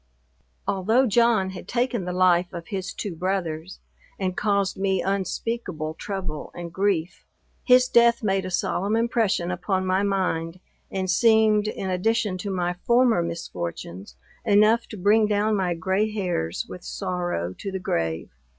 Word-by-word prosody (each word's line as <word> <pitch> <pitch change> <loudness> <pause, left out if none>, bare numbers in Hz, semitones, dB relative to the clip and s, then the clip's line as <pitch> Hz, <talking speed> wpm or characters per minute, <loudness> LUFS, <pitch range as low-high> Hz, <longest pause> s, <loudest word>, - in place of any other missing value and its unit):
Although 220 +7 +2
John 225 -4 +3
had 180 -1 -9
taken 240 -4 -1
the 180 - -3
life 180 -1 +3
of 170 -1 -7
his 190 -1 -3
two 195 -5 -5
brothers, 175 -1 -3 0.4
and 185 -2 -2
caused 200 -2 +1
me 190 -1 0
unspeakable 190 -4 -2
trouble 180 -3 -5
and 170 -1 -7
grief, 190 -4 -1 0.4
his 250 0 +5
death 235 -1 +4
made 195 -2 +1
a 185 - -4
solemn 195 +3 0
impression 225 -6 +1
upon 185 +1 -1
my 185 +1 +2
mind, 185 -4 -1 0.3
and 190 -1 -2
seemed, 215 +1 +4
in 195 -3 -3
addition 200 0 0
to 200 - -4
my 180 -2 -1
former 235 +2 +3
misfortunes, 95 - -6 0.3
enough 215 +2 +4
to 215 - -9
bring 210 +3 +4
down 210 +1 +1
my 180 -3 0
grey 190 +6 0
hairs 175 - -2
with 180 - -9
sorrow 175 - -3
to 195 - -4
the 190 - -2
grave. 80 - -2
190 Hz, 150 wpm, -24 LUFS, 175-215 Hz, 0.4 s, his